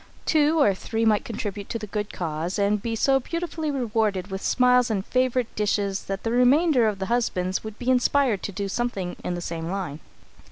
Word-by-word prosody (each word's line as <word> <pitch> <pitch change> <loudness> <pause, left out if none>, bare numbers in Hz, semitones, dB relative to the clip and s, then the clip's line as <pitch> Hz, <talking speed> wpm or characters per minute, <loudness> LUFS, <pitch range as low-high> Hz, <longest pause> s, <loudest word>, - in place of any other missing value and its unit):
Two 310 +1 +3
or 210 -9 +5
three 225 +4 -2
might 215 -2 +3
contribute 205 -3 -5
to - - -2
the 215 - -6
good 210 0 -4
cause 165 +2 -3
and 205 0 +1
be 230 +1 -2
so 270 +4 +3
beautifully 335 +2 -3
rewarded 220 -8 -1
with 190 0 -4
smiles 250 -1 +3
and 200 -3 -1
favourite 255 -1 0
dishes 200 -1 0
that 195 0 -4
the 225 - -1
remainder 250 +1 +4
of 210 -2 -1
the 190 - -3
husbands 190 -5 -1
would 220 -1 -7
be 250 +1 0
inspired 250 -4 +2
to - - -4
do 200 +1 -3
something 195 -4 -2
in 180 - -2
the 175 - -5
same 165 -1 -4
line. 180 -6 -4
215 Hz, 200 wpm, -25 LUFS, 195-250 Hz, -, or